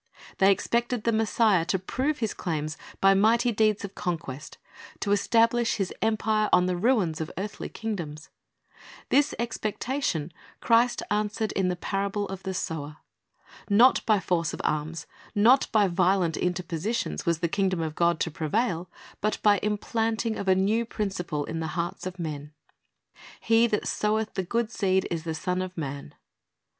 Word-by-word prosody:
They 195 +1 +6
expected 235 +3 0
the 230 - +2
Messiah 220 -4 +3
to 185 +2 +1
prove 260 +11 -2
His 215 - -4
claims 155 -2 -3 0.3
by 195 0 +6
mighty 230 +5 +3
deeds 215 -2 +1
of 200 - -9
conquest, 160 -5 -5 0.4
to 200 - -1
establish 230 +3 +3
His 195 -4 -2
empire 215 -1 +1
on 180 - +5
the 180 0 0
ruins 180 -6 +1
of 155 - -3
earthly 205 +2 -5
kingdoms. 170 -9 -5 0.8
This 285 +2 +3
expec 225 -2 -3
tatior^ 235 - -2 0.3
Christ 235 +1 +3
answered 210 0 0
in 190 -2 0
the 180 - 0
parable 200 +2 -2
of 195 -1 -6
the 190 -1 -4
sower. 150 -3 -4 0.7
Not 235 +6 +5
by 215 -2 +4
force 170 -4 -1
of - - -6
arms, 155 +2 -2 0.3
not 235 +6 +5
by 210 -2 +4
violent 180 -2 +2
interpositions, 180 +4 -2
was 170 -1 +2
the 170 - 0
kingdom 190 0 0
of 160 -1 -3
God 170 0 +2
to 165 - 0
prevail, 170 +3 -1 0.3
but 215 +1 0
by 205 -1 +5
the - - -2
implanting 225 +2 -1
of 200 - -5
a 190 - +5
new 205 +5 +2
principle 190 -9 -3
in 165 - -4
the 160 - -2
hearts 175 +2 -3
of 185 0 -7
men. 150 -3 -5 0.9
"He 230 +1 +4
that 210 -2 -1
soweth 215 +1 0
the - - -1
good 230 +5 -1
seed 190 -3 +1
is 165 -1 -3
the 160 -1 -2
Son 180 +2 -1
of 185 -1 -6
man." 140 -3 -5
195 Hz, 165 wpm, -27 LUFS, 170-220 Hz, 0.9 s, They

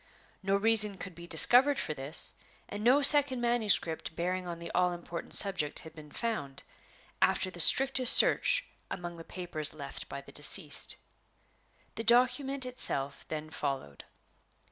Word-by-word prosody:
No 195 0 -1
reason 210 -1 +4
could 185 0 -9
be 170 +1 -13
discovered 250 - +3
for 155 - -4
this, 140 +3 +2 0.3
and 205 +1 -8
no 265 +5 +3
second 280 -2 +5
manuscript 220 -10 -1
bearing 180 +1 -4
on 170 -1 -7
the 170 0 -9
all 180 0 0
important 170 -1 -6
subject 190 -7 +1
had 160 -1 -7
been 155 -2 -14
found, 145 - -5 0.6
after 185 - 0
the 175 - -12
strictest 260 - +5
search - - +3 0.2
among 175 -1 -8
the 165 - -11
papers 160 -4 -1
left 140 -2 -9
by 140 - -8
the 140 - -14
deceased. 150 +1 0 1.0
The 225 - -6
document 255 +3 +1
itself 140 - -2
then 155 0 -7
followed. 135 - -6
180 Hz, 145 wpm, -29 LUFS, 155-240 Hz, 1.0 s, second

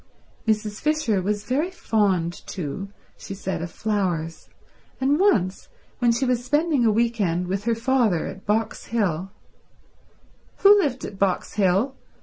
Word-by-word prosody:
Mrs. 210 -1 0
Fisher 300 -10 +1
was 205 +2 -1
very 290 +10 0
fond, 200 - 0
too, 185 +3 -5 0.3
she 195 - -7
said, 190 -3 -3
of 170 - -4
flowers, 180 -6 -2 0.5
and 275 +4 +2
once 195 - +2 0.3
when 240 -2 +4
she 235 +3 0
was 245 -1 0
spending 295 0 +2
a 225 - +4
week 230 +1 +1
end 175 -1 0
with 195 +3 -3
her 235 -1 +2
father 230 -7 +1
at 190 - -7
Box 220 +2 0
Hill— 190 -6 -1 1.3
"Who 405 +1 +9
lived 275 -9 -1
at 195 - -8
Box 195 -2 0
Hill?" 200 +7 +2
210 Hz, 145 wpm, -24 LUFS, 190-250 Hz, 1.3 s, Who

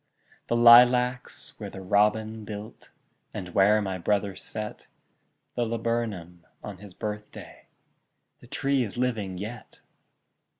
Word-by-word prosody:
The 120 - 0
lilacs 125 +1 +5
where - - -6
the 95 - -9
robin 105 +3 +1
built, 105 0 -9 0.5
And 90 - -5
where 105 +3 +4
my 95 -2 -3
brother 100 +1 0
set 110 -1 -7 0.7
The 120 - -1
laburnum 110 -7 -3 0.2
on 100 -3 -8
his 100 -3 -13
birthday, 105 +1 -8 0.7
The - - -16
tree 140 0 0
is 110 0 -6
living 110 -7 -2
yet! 110 +5 -8
105 Hz, 120 wpm, -26 LUFS, 100-120 Hz, 0.7 s, lilacs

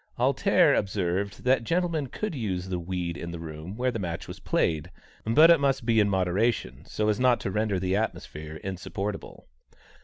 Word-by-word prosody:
"Alter" - - +4
observed 95 0 -1
that 130 -1 +3
gentlemen 165 0 0
could 210 - -4
use 95 - -3
the 90 -1 -2
weed 85 -1 -3
in 85 0 -6
the 85 - -6
room 80 +4 -8
where 125 +1 +1
the 115 - -4
match 85 -3 -4
was - - -8
played, 80 0 0 0.4
but 155 +10 +7
it 165 - +6
must 135 -3 +1
be 115 -1 +3
in 105 -1 +3
moderation, 95 - 0
so 105 - -2
as 105 -1 +1
not 125 -1 +4
to 95 - -3
render 105 -1 0
the 95 +1 0
atmosphere 80 -7 -4
insupportable. 100 +2 -5
100 Hz, 180 wpm, -27 LUFS, 90-120 Hz, 0.4 s, but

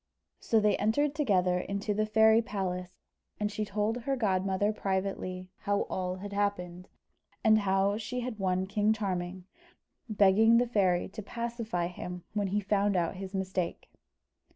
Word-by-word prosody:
So 225 - +2
they 210 -1 +3
entered 275 +8 +1
together 185 -11 +2
into 200 +3 -2
the 215 +1 0
fairy 220 +1 +5
palace, 185 -4 -4 0.4
and 210 0 -1
she 215 - -2
told 210 +2 -1
her 270 +3 -1
godmother 195 -2 +1
privately 190 -2 -3
how 200 0 0
all 185 -1 -2
had 200 +2 -7
happened, 180 -3 -2 0.6
and 215 -2 +6
how 195 0 +1
she 250 +3 -4
had 240 -3 -5
won 185 -1 0
King 210 +2 +2
Charming, 185 -3 -3 0.6
begging 215 +2 +5
the 245 - +3
fairy 190 -7 +1
to 205 - -7
pacify 230 -4 -3
him 180 0 -6
when 205 -2 0
he 205 +2 0
found 200 0 +1
out 175 +1 0
his 195 +1 -6
mistake. 185 -2 -3
200 Hz, 155 wpm, -30 LUFS, 185-215 Hz, 0.6 s, and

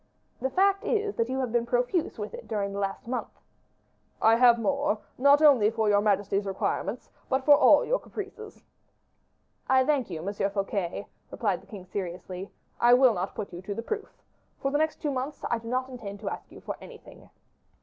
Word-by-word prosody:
"The 265 - 0
fact 390 +6 +2
is 420 -2 0
that 230 +1 0
you 260 - -2
have 250 -3 -2
been 235 0 +1
profuse 245 +8 0
with - - -5
it 480 0 -9
during 200 -2 -2
the 200 - -4
last 195 +2 -3
month." 250 +1 -4 0.8
"I 225 +1 +5
have 240 -1 +6
more, 275 +1 0 0.2
not 280 +3 +5
only 255 -9 +6
for 225 0 -4
all 215 - +3
your 205 0 +4
majesty's 205 -1 +1
requirements, 195 +3 -3 0.2
but 265 0 0
for 290 - +8
all - - +6
your - - +1
caprices." 420 +1 -9 1.1
"I 260 0 +5
thank 280 -6 +1
you, 165 -3 -5
Monsieur 200 +1 -1
Fouquet," 195 -1 -3 0.2
replied 205 -6 -1
the - - -21
king, 195 -4 -10
seriously. 185 0 -6 0.3
"I 240 +1 +6
will 255 -2 +5
not 185 0 -4
put 200 -4 -6
you 175 - -7
to 200 +1 -5
the 230 - -4
proof. 435 - -4 0.5
For 275 - -1
the 290 - +1
next 315 0 -1
two 295 - 0
months 270 +2 -4
I 235 - +1
do 230 - -11
not 255 +2 -1
intend 220 -6 -8
to 200 - -3
ask - - -8
you - - -12
for - - -5
anything." - - -13
235 Hz, 200 wpm, -27 LUFS, 200-275 Hz, 1.1 s, for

